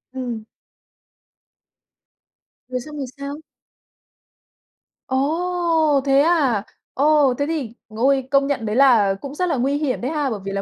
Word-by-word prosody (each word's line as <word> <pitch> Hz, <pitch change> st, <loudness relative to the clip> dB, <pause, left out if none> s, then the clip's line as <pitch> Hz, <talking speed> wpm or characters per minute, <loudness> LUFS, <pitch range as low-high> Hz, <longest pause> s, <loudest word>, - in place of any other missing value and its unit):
Ừm. 240 Hz, -4 st, -4 dB, 2.3 s
Rồi 255 Hz, -1 st, -3 dB
xong 300 Hz, +2 st, -9 dB
rồi 275 Hz, -, -3 dB
sao? 280 Hz, +1 st, -6 dB, 1.7 s
Ồ, 320 Hz, +1 st, +1 dB
thế 275 Hz, 0 st, +4 dB
à? 285 Hz, -, +2 dB, 0.3 s
Ồ, 290 Hz, -2 st, +3 dB
thế 285 Hz, -, 0 dB
thì 285 Hz, -9 st, -3 dB
ôi, 260 Hz, +4 st, +1 dB
công 275 Hz, 0 st, +3 dB
nhận 260 Hz, -6 st, -2 dB
đấy 210 Hz, +1 st, -2 dB
là 235 Hz, -8 st, +5 dB
cũng 280 Hz, +1 st, -7 dB
rất 360 Hz, +1 st, -1 dB
là 305 Hz, -, +1 dB
nguy 270 Hz, +3 st, 0 dB
hiểm 285 Hz, -5 st, -2 dB
đấy 260 Hz, +5 st, -2 dB
ha. 295 Hz, -3 st, -1 dB
Bởi 215 Hz, -3 st, -4 dB
vì 195 Hz, -, -4 dB
là 195 Hz, 0 st, -2 dB
275 Hz, 145 wpm, -21 LUFS, 250-300 Hz, 2.3 s, là